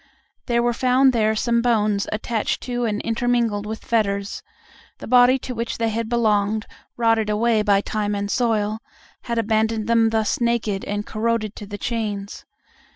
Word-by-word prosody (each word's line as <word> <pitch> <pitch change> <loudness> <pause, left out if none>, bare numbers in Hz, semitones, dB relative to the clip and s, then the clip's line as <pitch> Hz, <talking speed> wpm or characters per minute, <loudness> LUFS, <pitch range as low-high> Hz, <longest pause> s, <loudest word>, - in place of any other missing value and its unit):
There 235 -1 +2
were 240 0 +1
found 255 +2 +3
there 220 -2 +2
some 235 +1 +1
bones 215 -4 +1
attached 220 +1 -2
to 245 -1 -2
and 215 -1 -1
intermingled 230 -3 0
with 220 +1 -6
fetters; 200 -3 -1 0.6
the - - -9
body 250 +1 +5
to 255 0 -6
which 230 0 -3
they 230 -1 0
had 225 0 -3
belonged, 215 -2 +1 0.3
rotted 225 -2 +2
away 220 +1 +2
by 200 -2 +3
time 210 0 -2
and 200 0 -2
the - - -2
soil, 220 -3 0 0.5
had 235 -1 -2
abandoned 220 0 +1
them 230 0 +3
thus 220 +1 0
naked 235 -4 0
and 205 +1 -3
corroded 220 -1 -1
to 205 - -8
the 205 0 -6
chains. 210 -3 -4
225 Hz, 165 wpm, -22 LUFS, 210-235 Hz, 0.6 s, body